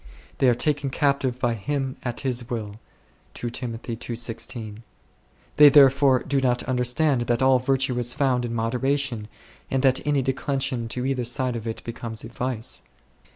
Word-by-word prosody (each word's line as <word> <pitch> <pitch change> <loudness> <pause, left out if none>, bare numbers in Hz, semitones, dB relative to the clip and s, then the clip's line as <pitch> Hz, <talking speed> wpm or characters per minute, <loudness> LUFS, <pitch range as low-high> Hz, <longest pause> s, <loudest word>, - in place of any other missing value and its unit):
They 130 - +5
"are 120 - +3
taken 145 +1 0
captive 135 -2 0
by 120 -2 +1
him 135 +4 -3
at 120 -2 -4
his 125 -3 -1
will1." 115 -4 -5 2.8
They 150 -1 +10
therefore 135 -2 +5
do 140 -1 0
not 125 -2 +1
understand 125 +2 +1
that 120 +1 +1
all 130 -1 +5
virtue 130 -1 0
is 120 0 0
found 130 -4 +1
in 120 -1 -3
moderation, 125 0 -1 0.4
and 135 0 0
that 130 -1 +4
any 145 -2 +1
declension 130 -1 -1
to 125 +2 -3
either 130 -2 -1
side 125 +1 +1
2 - - -3
of 115 - -9
it 110 - -5
becomes 115 -1 -6
a 115 - -8
vice. 120 -1 -3
130 Hz, 155 wpm, -24 LUFS, 120-135 Hz, 2.8 s, They